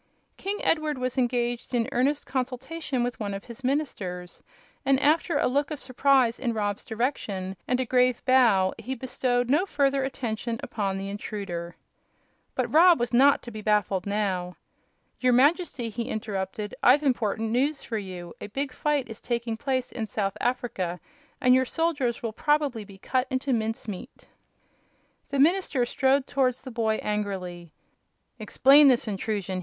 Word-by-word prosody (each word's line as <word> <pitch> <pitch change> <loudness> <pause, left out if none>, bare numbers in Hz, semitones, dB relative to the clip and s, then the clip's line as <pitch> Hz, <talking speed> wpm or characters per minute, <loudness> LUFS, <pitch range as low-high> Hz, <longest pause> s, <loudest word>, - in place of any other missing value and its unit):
King 400 +2 -3
Edward 310 -3 +1
was 255 -1 -2
engaged 245 -1 -1
in 230 -1 +1
earnest 280 +4 +1
consultation 265 +1 -3
with 245 0 -3
one 200 -2 -3
of 195 - -7
his 240 +2 -11
ministers, 195 -11 -3 0.4
and 270 -1 +3
after 310 +2 +2
a - - +2
look 280 +3 +1
of 305 -3 -5
surprise 255 -2 +2
in 240 -3 -1
Rob's 205 -1 -2
direction 210 -6 -3
and 250 - +1
a 260 - 0
grave 250 0 +2
bow 230 -8 +4
he 260 +2 -4
bestowed 245 -1 -1
no 305 +9 +2
further 275 -4 +1
attention 235 -3 -3
upon 195 -3 -2
the 195 0 -4
intruder. 190 -4 -5 0.8
But - - -1
Rob 340 0 +7
was 240 +1 -2
not 275 +4 +5
to 240 - -8
be 215 -1 -7
baffled 205 -3 +1
now. 190 -4 -1 0.6
"Your 250 -1 +3
Majesty," 275 -2 +2
he 235 +3 -4
interrupted, 205 -1 -4
"I've 280 +4 +5
important 225 -4 0
news 275 +5 0
for 225 -2 -3
you. 180 -3 -8
A - - -5
big 270 +6 -3
fight 290 -1 0
is 225 -1 -9
taking 235 -2 -2
place 260 +1 -2
in 220 -2 -4
South 200 -1 -2
Africa 230 -8 -2 0.4
and 250 -1 +5
your 260 0 +4
soldiers 285 -7 -1
will 225 -2 -3
probably 290 -5 +1
be 200 -1 -14
cut 255 +6 -1
into 260 0 -1
mince 225 -1 -2
meat." 195 -4 -8 1.0
The 280 - -2
minister 305 -3 +3
strode 265 +2 +2
towards 255 -3 0
the 260 - -8
boy 225 -2 0
angrily. 185 -5 -3 0.7
"Explain 275 +6 +6
this 250 -3 +3
intrusion!" 195 -2 -2
245 Hz, 160 wpm, -26 LUFS, 210-270 Hz, 1.0 s, Rob